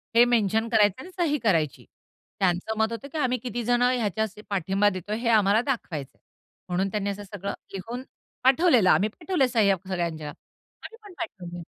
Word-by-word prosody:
हे 235 - +8
मेन्शन 225 -2 +2
करायचं 210 +1 +3
आणि 370 - -11
सही 300 -3 +2
करायची. 160 -9 +1 0.5
त्यांचं 190 +4 0
मत 220 +1 +1
होतं 250 +5 -6
की 315 - -5
आम्ही 255 -3 +1
कितीजणं 245 +1 +1
ह्याच्या 220 -1 0 0.2
पाठिंबा 195 +2 +2
देतोय 205 +3 -4
हे 235 0 -1
आम्हाला 210 -1 +4
दाखवायचंय. 180 - -4 0.5
म्हणून 185 +2 0
त्यांनी 200 -1 -2
असं 200 +1 -5
सगळं 200 0 -5 0.2
लिहून 230 +7 -5 0.4
पाठवलेलं. 260 - +5
आम्ही 210 +4 +4
पाठवलंय 325 - 0
सह्या 215 -5 +3
सगळ्यांच्या. 170 -5 -3
आम्ही 455 - -15
पण 400 -3 -12
पाठवले. 175 - -6
215 Hz, 160 wpm, -26 LUFS, 190-245 Hz, 0.5 s, हे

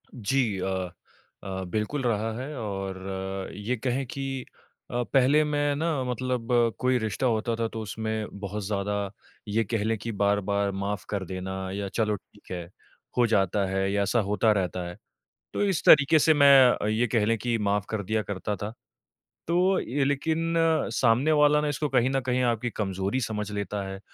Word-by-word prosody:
जी 115 -3 0
अ 95 -1 -2 0.5
अ, 95 -1 -4
बिल्कुल 110 +9 -2
रहा 115 -2 0
है, 145 +4 -5
और 95 -2 -4
ये 105 +5 -2
कहें 130 +3 -1
कि 135 0 -4 0.5
अ, 120 0 0
पहले 140 +3 +5
मैं 145 -1 0
ना 155 -2 0
मतलब 125 -1 -2 0.3
कोई 130 0 +2
रिश्ता 110 +2 -2
होता 115 0 0
था 115 0 -1
तो 110 0 -6
उसमें 110 0 -3
बहुत 100 +1 -4
ज़्यादा, 100 0 -2 0.4
ये 110 +2 +1
कह 110 0 -2
लें 110 +1 0
कि 115 +3 -5
बार-बार 100 -1 +1
माफ़ 100 +1 -3
कर 100 -2 -2
देना 95 +1 -5 0.2
या 100 +1 -3
चलो, 105 0 0
ठीक 105 +1 -17
है, 90 -2 -4 0.5
हो 120 - +5
जाता 100 0 +2
है 95 0 0
या 100 0 +1
ऐसा 100 +5 +1
होता 110 +2 +3
रहता 90 -1 -2
है। 90 - -8 0.6
तो - - 0
इस 195 -5 0
तरीके 155 +1 +7
से 155 +2 +5
मैं 140 -3 +7
अ, - - -1
ये 110 +3 +1
कह 110 -1 +1
लें 115 +1 +2
कि 115 +2 -1
माफ़ 100 -1 +1
कर 110 -2 -2
दिया 110 +3 0
करता 100 +2 -3
था। 105 +3 -5 0.7
तो 180 +3 +3
ये 135 +4 -1
लेकिन 160 +4 0 0.4
सामने 125 +5 +3
वाला 150 0 +5
ना 150 - -1
इसको 145 +1 -1
कहीं 130 -1 +2
न 135 0 +1
कहीं 125 0 0
आपकी 115 +2 -3
कमज़ोरी 100 +3 -2
समझ 105 -3 -3
लेता 105 0 -3
है, 95 0 -7
110 Hz, 180 wpm, -27 LUFS, 100-130 Hz, 0.7 s, तरीके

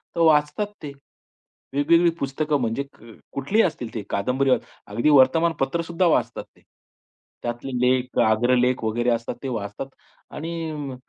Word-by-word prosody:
तर - - -3
वाचतात 150 +5 +3 0.2
ते. 145 - -5 0.8
वेगवेगळी 165 +4 +4
पुस्तकं 145 +2 -1
म्हणजे 115 +4 -1 0.5
कुठलीही 195 +12 +2
असतील 125 -10 -4
ते 110 - -3
कादंबरी 130 +7 +1
अस - - +3 0.3
अगदी 120 +8 +1
वर्तमानपत्र 145 +2 +3
सुद्धा 170 +2 0
वाचतात - - +1
ते. - - -24 0.8
त्यातले 120 +3 -4
लेख, 125 0 +1
आग्रलेख 125 +2 +2
वगैरे 120 +2 0
असतात 115 +1 -2
ते 135 - -2
वाचतात 105 +2 -4 0.5
आणि 165 +3 -5 0.4
अ, - - -8
135 Hz, 135 wpm, -23 LUFS, 120-155 Hz, 0.8 s, वेगवेगळी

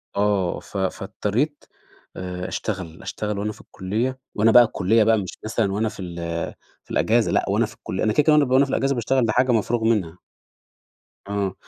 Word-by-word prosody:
آه، 100 -3 +1
ف - - -9
فاضطريت 105 +9 -2 0.5
آآ 90 0 -5
أشتغل، 90 -6 -4
أشتغل 105 -1 -3
وأنا 105 +1 -2
في - - -13
الكُليّة 115 +8 -3 0.2
وأنا 110 +2 +4
بقى 120 +1 +9
الكُليّة 110 0 +2
بقى 110 +1 +4
مش 95 -3 -5
مثلًا 110 -2 0
وأنا 110 +2 0
في - - -13
ال 90 -2 -6 0.7
في - - -17
الإجازة - - +2
لأ - - +2
وأنا - - +2
في - - -10
الكُليّ 95 - -4
أنا 110 0 +2
كده، 150 - +4
كده 155 - +4
وأنا 150 -1 +5
ب 130 +2 +4
في 140 - -3
الإجازة 135 +1 +1
باشتغل 125 +1 +1
دي 110 - +1
حاجة 130 +3 +3
مفروغ 115 0 +1
منها. 95 -7 0 1.1
آه 100 -2 -1
110 Hz, 190 wpm, -23 LUFS, 95-120 Hz, 1.1 s, بقى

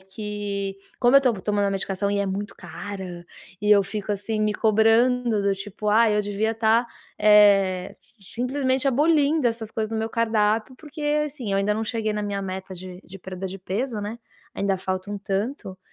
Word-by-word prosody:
que 200 0 -4 0.2
como 245 +3 +6
eu - - +8
tô 250 - +3
tomando 205 +1 0
a - - -1
medicação 195 0 -2
e 205 - 0
é 200 - 0
muito 200 +2 -4
cara, 180 0 -7 0.4
e 210 - +2
eu 205 -1 +7
fico, 205 +1 -4
assim, 210 +2 -3
me 210 0 +2
cobrando 225 +1 +3
do 200 0 +2
tipo: 205 +2 -5
"Ah, 220 +1 +5
eu 210 - +2
devia 205 +2 -1
estar, 225 +1 +2 0.3
eh, 200 -3 +4 0.2
simplesmente 260 +6 -1
abolindo 295 +1 +3
essas 225 -1 -5
coisas 220 -1 -2
do 225 - -2
meu 220 0 -2
cardápio", 225 +1 +1
porque, 305 +2 -10 0.2
assim, 265 -7 -6
eu - - +2
ainda 205 +1 +1
não 220 +1 -2
cheguei 220 -1 -2
na 210 0 -2
minha 200 -1 -3
meta 190 0 -6
de 180 0 -9
de 195 +1 -11
perda 190 +1 -6
de 195 +1 -7
peso, 215 +5 -3
né, 210 +3 -5 0.4
ainda 195 -1 0
falta 185 +1 -4
um 205 - -3
tanto, 195 0 -3
210 Hz, 190 wpm, -24 LUFS, 195-225 Hz, 0.4 s, eu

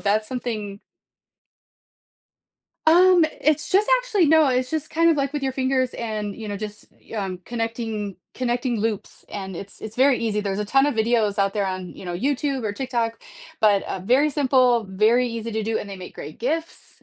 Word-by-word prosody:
that's 215 +1 +1
something 215 -6 -4 2.1
Um, 350 +1 +6 0.2
it's 305 -1 +2
just 410 +5 +3
actually 435 -9 +1
No, 315 -1 +5
it's 255 0 0
just 315 -1 -3
kind 330 +1 +4
of, 320 - +2
like, 275 -1 -1
with 295 -2 -3
your 265 - 0
fingers 260 -1 0
and, 215 -3 -4
you 220 -2 -7
know, 205 - -3
just 210 0 -7
you - - -10
um, 190 -3 -3
connecting 225 -4 -3 0.2
connecting 245 -1 -1
loops, 220 -2 -3
and 190 -3 -6
it's 200 +2 -8
it's 220 0 -7
very 265 +1 +5
easy, 215 -2 0
there's 200 -1 -2
a - - -1
ton 270 +6 +3
of 290 - 0
videos 220 -2 +2
out 195 0 +2
there 200 -1 0
on, 185 -1 -4
you - - -11
know, 175 -1 -4
YouTube 275 +3 -1
or 205 - -1
TikTok, 235 -1 -2 0.4
but, 205 -2 +4
uh, - - -4
very 255 +10 +3
simple, 255 -5 +3
very 220 +6 +3
easy 230 0 -4
to 220 0 -2
do, 220 0 0
and 200 - -7
they 195 - -6
make 185 -1 -10
great 150 +2 -9
gifts, 320 +7 -4
230 Hz, 195 wpm, -23 LUFS, 210-270 Hz, 2.1 s, Um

